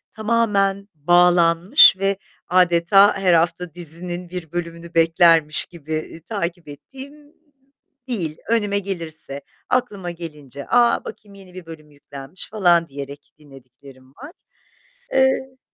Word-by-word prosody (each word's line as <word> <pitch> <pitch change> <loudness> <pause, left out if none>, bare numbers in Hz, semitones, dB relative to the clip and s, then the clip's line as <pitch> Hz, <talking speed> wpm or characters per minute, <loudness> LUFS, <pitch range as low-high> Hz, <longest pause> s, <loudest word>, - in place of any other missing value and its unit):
tamamen 210 -3 0
bağlanmış 175 - +5
ve 195 0 0 0.3
adeta 180 +3 +4
her 185 -2 +2
hafta 170 0 0
dizinin 175 +1 -6
bir 175 -3 -8
bölümünü 170 -1 -6
beklermiş 165 -1 +3
gibi 160 -2 -9
i 160 +1 -9
takip 175 -5 -5
ettiğim 275 - -13 0.7
değil, 170 -11 -3
önüme 205 -3 +1
gelirse, 165 -7 -7 0.3
aklıma 210 -8 -2
gelince. 150 -5 -10
"A, 240 0 +2
bakayım 200 -2 -11
yeni 190 -2 -15
bir 185 -2 -11
bölüm 155 -2 -13
yüklenmiş." 140 +3 -11
falan 175 -5 +2
diyerek 140 +1 -10
dinlediklerim 135 -2 -17
var. 285 +5 -11 0.8
Eee 265 0 +1
175 Hz, 115 wpm, -20 LUFS, 160-200 Hz, 0.8 s, bağlanmış